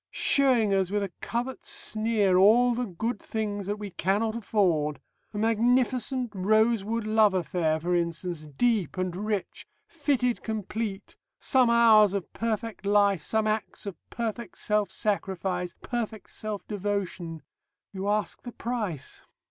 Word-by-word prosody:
Showing 275 - +3
us 190 -2 +1
with 205 +1 0
a 190 -3 -5
covert 245 +3 -3
sneer 215 -3 +1
all 230 +6 +6
the 245 0 -2
good 210 +5 -3
things 205 -3 -3
that 205 - -1
we 205 -2 -7
cannot 205 +6 0
afford. 170 - +1 0.3
A 205 - -7
magnificent 245 +3 +1
Rosewood 215 +2 +2
love 215 -2 +4
affair, 165 -3 0
for 175 +3 -1
instance, 170 -2 -2
deep 195 - 0
and 185 -1 -2
rich, 205 0 -3 0.2
fitted 275 -6 0
complete, 215 -1 -4 0.2
some 255 -3 +3
hours 220 -4 +6
of 200 -3 -4
perfect 225 -2 -3
life, 200 -3 +3
some 220 +7 0
acts 215 0 -2
of 200 -3 -5
perfect 230 -3 -4
self 210 -2 0
sacrifice, 190 -3 -2
perfect 225 -3 -4
self 215 -2 -5
devotion.... 190 -5 -3 0.5
You 195 +1 -3
ask 210 0 -1
the 245 - -8
price." 215 - -4
210 Hz, 135 wpm, -27 LUFS, 190-230 Hz, 0.5 s, all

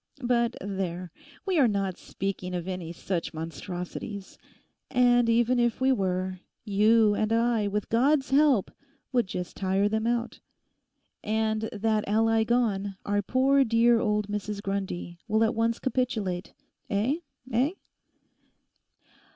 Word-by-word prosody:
But 240 -1 +1
there—we 195 - -4
are 265 - +6
not 195 -3 -1
speaking 185 -2 -4
of 175 0 -4
any 180 -3 -4
such 170 -1 -4
monstrosities, 180 - -6 0.5
and 245 -2 +4
even 240 +2 +3
if 240 -2 +1
we 260 +1 +3
were, 185 -4 -1 0.3
you 215 +1 +4
and 215 +1 0
I 230 -2 +2
with 210 +1 -2
God's 270 +4 +2
help 275 -7 +4 0.4
would 245 -6 +1
just 180 -1 -5
tire 195 +1 +1
them 220 +2 -1
out. 235 0 -1 0.8
And 220 0 0
that 215 0 0
ally 225 +1 +3
gone, 215 -4 0
our 205 0 +1
poor 265 +6 +3
dear 230 0 +4
old 210 -2 0
Mrs 210 0 -4
Grundy 195 -3 -4
will 220 +1 +2
at 225 - +2
once 230 0 +1
capitulate. 220 -9 -2 0.4
Eh? 220 +9 +1 0.3
Eh? 255 +8 +2
215 Hz, 125 wpm, -27 LUFS, 195-240 Hz, 0.8 s, are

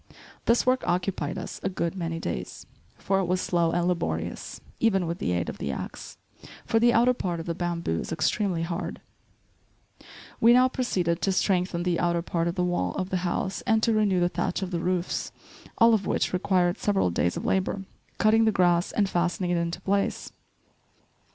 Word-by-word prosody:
This 235 +1 +3
work 255 0 +2
occupied 180 -4 -1
us - - -6
a 195 - -1
good 170 -3 -2
many 165 -3 -3
days, 65 - -5 0.3
for 195 0 0
it 190 - 0
was 180 +1 0
slow 170 -2 +1
and 175 +1 0
laborious, 180 -1 -3 0.2
even 195 -5 +2
with 170 +1 -4
the - - -1
aid 85 -1 -1
of - - -6
the - - -2
axe; - - -7 0.5
for 225 - +2
the 240 +1 +5
outer 240 +2 +4
part 175 -8 -3
of 165 - -6
the 170 - -2
bamboo 170 - -2
is - - -6
extremely 170 +2 0
hard. 170 +2 -4 1.4
We 230 +1 +6
now 255 +1 +5
proceeded 180 -10 -1
to 195 - +1
strengthen 180 -2 +1
the 175 -2 0
outer 170 -1 +1
part 170 -1 -1
of 170 - -2
the 180 - 0
wall 175 - -1
of 185 0 -3
the 185 - +1
house, 185 +2 -2
and 220 -1 +3
to 230 - +3
renew 205 -4 +2
the 175 - +3
thatch 180 +2 -2
of 185 - -4
the 170 - -1
roofs, 180 +1 -1 0.5
all 230 0 +6
of 205 -3 +1
which - - 0
required 180 -1 +1
several 195 - +1
days 85 +1 0
of - - -5
labor, 190 +1 0 0.3
cutting 225 +1 +4
the 220 - +4
grass 175 -2 +2
and 205 -2 +1
fastening 175 0 0
it 175 - +2
into 170 0 -2
place. 200 0 -1
180 Hz, 195 wpm, -26 LUFS, 170-200 Hz, 1.4 s, We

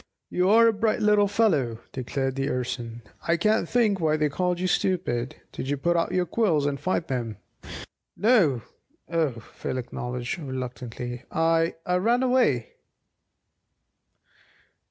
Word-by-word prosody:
"You're 210 +6 +5
a 225 - +4
bright 215 +1 +1
little 210 -1 +4
fellow," 170 - +2
declared 135 +1 -2
the 135 0 -1
Urson; 120 -2 -4 0.2
"I 170 0 +3
can't 215 +6 +2
think 220 -5 +2
why 155 -2 +2
they 150 -1 +1
called 180 +4 -1
you 185 - -1
'stupid.' 175 -10 0 0.2
Did 130 - -5
you 145 - 0
put 170 +5 +1
out 170 - +1
your 180 -1 +1
quills 170 -7 +1
and 140 -1 -1
fight 180 -2 -1
them?" 120 -6 -3 0.8
"No, 180 - +3 0.5
o," 160 -5 +1 0.2
Phil 130 - -4
acknowledged 125 +2 -4
reluctantly. 125 -3 -5
"I 165 0 +2
I 180 0 +2
ran 235 +7 +2
away." 245 - +1
160 Hz, 135 wpm, -26 LUFS, 130-195 Hz, 0.8 s, You're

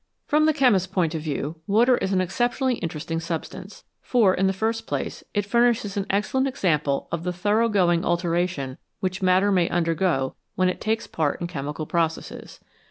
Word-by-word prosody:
From 305 +1 +3
the 315 - +4
chemist's 245 -10 +3
point 170 -4 +1
of 160 - -3
view, 150 +1 -3
water 235 +5 +4
is 190 - -2
an 185 -1 +2
ex 185 +1 -4
ceptionally 245 +1 +1
interesting 165 0 -3
substance. 180 +4 -6 0.2
For, 220 -7 +3
in 190 +1 +1
the - - +2
first 220 +4 -2
place, - - -4
it 205 -1 +1
furnishes 235 -2 +2
an 200 -1 -2
excellent 210 +7 +1
example 150 - 0
of 170 - -2
the 180 - -1
thorough 210 +6 +1
going 175 -5 +2
alteration 175 -5 -1 0.2
which 185 +1 -2
matter 185 +2 +3
may 180 -3 +2
undergo 165 -5 0 0.2
when 185 0 +2
it 185 - -4
takes 220 +1 -1
part 155 -3 -1
in 175 - -3
chemical 150 -2 -4
processes. 165 0 -3
185 Hz, 180 wpm, -24 LUFS, 165-210 Hz, 0.2 s, the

